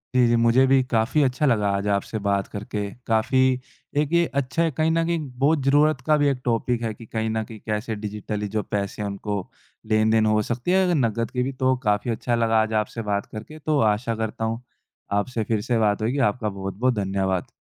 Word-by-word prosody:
जी, 125 Hz, -1 st, +5 dB
जी 120 Hz, -, +3 dB
मुझे 115 Hz, +3 st, +4 dB
भी 135 Hz, 0 st, +5 dB
काफ़ी 125 Hz, +4 st, +1 dB
अच्छा 130 Hz, +3 st, +1 dB
लगा 105 Hz, -6 st, +2 dB
आज 100 Hz, +1 st, -2 dB
आपसे 105 Hz, +2 st, -2 dB
बात 100 Hz, -1 st, +1 dB
करके। 105 Hz, 0 st, -4 dB, 0.2 s
काफ़ी, 130 Hz, +3 st, +2 dB, 0.4 s
एक 150 Hz, +1 st, +1 dB
ये 170 Hz, 0 st, +4 dB, 0.2 s
अच्छा 130 Hz, +6 st, -1 dB
है 165 Hz, -, +1 dB
कहीं 160 Hz, +3 st, +1 dB
न 165 Hz, 0 st, +2 dB
कहीं 170 Hz, -1 st, 0 dB, 0.2 s
बहुत 145 Hz, +1 st, +3 dB
ज़रूरत 145 Hz, 0 st, +3 dB
का 155 Hz, -1 st, +5 dB
भी 145 Hz, -, +3 dB
एक 130 Hz, -2 st, -2 dB
टॉपिक 120 Hz, 0 st, 0 dB
है, 110 Hz, -2 st, -2 dB
कि 115 Hz, -, -12 dB
कहीं 110 Hz, 0 st, -2 dB
न 110 Hz, 0 st, -1 dB
कहीं 110 Hz, -1 st, -11 dB
कैसे 110 Hz, +1 st, -2 dB
डिजिटली 105 Hz, 0 st, -4 dB
जो 105 Hz, +1 st, -2 dB
पैसे 100 Hz, 0 st, -3 dB
हैं 105 Hz, -, -2 dB
उनको 100 Hz, +1 st, -3 dB, 0.5 s
लेन-देन 110 Hz, 0 st, +3 dB
हो 105 Hz, 0 st, +3 dB
सकती 120 Hz, +9 st, -1 dB
है, 190 Hz, 0 st, +4 dB
अगर 175 Hz, -2 st, +2 dB
नकद 115 Hz, -3 st, 0 dB
की 125 Hz, -1 st, 0 dB
भी 135 Hz, -, -2 dB
तो 130 Hz, 0 st, +4 dB
काफ़ी 105 Hz, +3 st, +1 dB
अच्छा 120 Hz, +1 st, -1 dB
लगा 115 Hz, -1 st, +3 dB
आज 110 Hz, 0 st, -2 dB
आपसे 115 Hz, -, -7 dB
बात 100 Hz, 0 st, 0 dB
करके। 155 Hz, +9 st, -9 dB
तो 150 Hz, -1 st, 0 dB
आशा 115 Hz, +2 st, -2 dB
करता 110 Hz, 0 st, -3 dB
हूँ, 115 Hz, +2 st, -2 dB, 0.5 s
आपसे 110 Hz, +3 st, 0 dB
फिर 110 Hz, -1 st, -1 dB
से 120 Hz, +2 st, 0 dB
बात 105 Hz, -1 st, +2 dB
होएगी। 120 Hz, +6 st, 0 dB
आपका 110 Hz, -3 st, -3 dB
बहुत-बहुत 100 Hz, +6 st, -1 dB
धन्यवाद। 95 Hz, -2 st, -1 dB
115 Hz, 220 wpm, -24 LUFS, 105-130 Hz, 0.5 s, जी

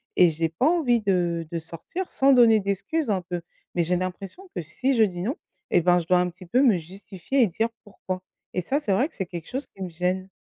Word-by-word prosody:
et 180 Hz, -, +6 dB
j'ai 165 Hz, +1 st, 0 dB
pas 165 Hz, -, 0 dB
envie 270 Hz, -9 st, +2 dB
de 175 Hz, -4 st, 0 dB
de 170 Hz, -, -2 dB
sortir 165 Hz, -, -6 dB
sans 275 Hz, +1 st, +3 dB
donner 230 Hz, -4 st, +6 dB
d'excuses 200 Hz, -, -1 dB
un 190 Hz, -3 st, +1 dB
peu, 175 Hz, -1 st, -2 dB, 0.3 s
mais 175 Hz, -, +2 dB
j'ai 180 Hz, +2 st, +1 dB
l'impression 185 Hz, -, -5 dB
que -, -, -2 dB
si 255 Hz, -, 0 dB
je 225 Hz, -, +5 dB
dis 180 Hz, -4 st, -1 dB
non, 250 Hz, -, -1 dB, 0.4 s
eh 175 Hz, -, +4 dB
ben, 180 Hz, +1 st, +4 dB
je 165 Hz, -, -6 dB
dois 180 Hz, 0 st, +4 dB
un 180 Hz, -, 0 dB
petit 180 Hz, +1 st, -13 dB
peu 245 Hz, +9 st, +2 dB
me 235 Hz, -9 st, +5 dB
justifier 190 Hz, -, -3 dB
et 235 Hz, -, +5 dB
dire 220 Hz, +6 st, 0 dB, 0.2 s
pourquoi 185 Hz, -2 st, -6 dB, 0.3 s
et 180 Hz, -, 0 dB
ça, 275 Hz, +11 st, 0 dB
c'est 210 Hz, -10 st, 0 dB
vrai 245 Hz, +9 st, +2 dB
que -, -, -25 dB
c'est 190 Hz, -, -2 dB
quelque 170 Hz, -2 st, -7 dB
chose 265 Hz, +3 st, -3 dB
qui 195 Hz, -, -9 dB
me 185 Hz, -, -4 dB
gêne. 180 Hz, +3 st, -2 dB
190 Hz, 245 wpm, -25 LUFS, 175-240 Hz, 0.4 s, et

